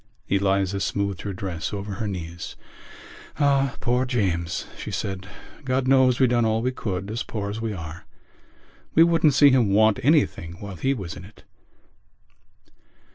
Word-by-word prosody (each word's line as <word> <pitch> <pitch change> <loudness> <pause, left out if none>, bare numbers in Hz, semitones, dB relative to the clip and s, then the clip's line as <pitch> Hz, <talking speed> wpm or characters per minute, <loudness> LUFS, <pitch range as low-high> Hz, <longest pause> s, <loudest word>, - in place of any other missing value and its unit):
Eliza 100 0 +1
smoothed 100 -1 -2
her 100 - -4
dress 90 -3 -4
over 100 0 -5
her 110 - -1
knees. 85 -3 -6 0.8
"Ah, 140 -3 +2
poor 125 +1 +1
James!" 95 -9 -1
she - - -7
said. 95 -1 -4 0.4
"God 130 0 0
knows 130 -2 +4
we 130 - +6
done 120 -1 +2
all 110 0 +1
we 125 - +1
could, 100 -5 -4
as 115 +2 -3
poor 100 -2 -4
as 110 +2 -5
we 115 -1 -2
are—we 85 - -4
wouldn't 165 -4 +3
see 140 0 +7
him 125 -5 +3
want 110 +1 +4
anything 135 - +2
while 100 +2 -8
he 135 +9 0
was 95 -8 -6
in - - -10
it." 100 +3 -16
105 Hz, 155 wpm, -24 LUFS, 95-130 Hz, 0.8 s, see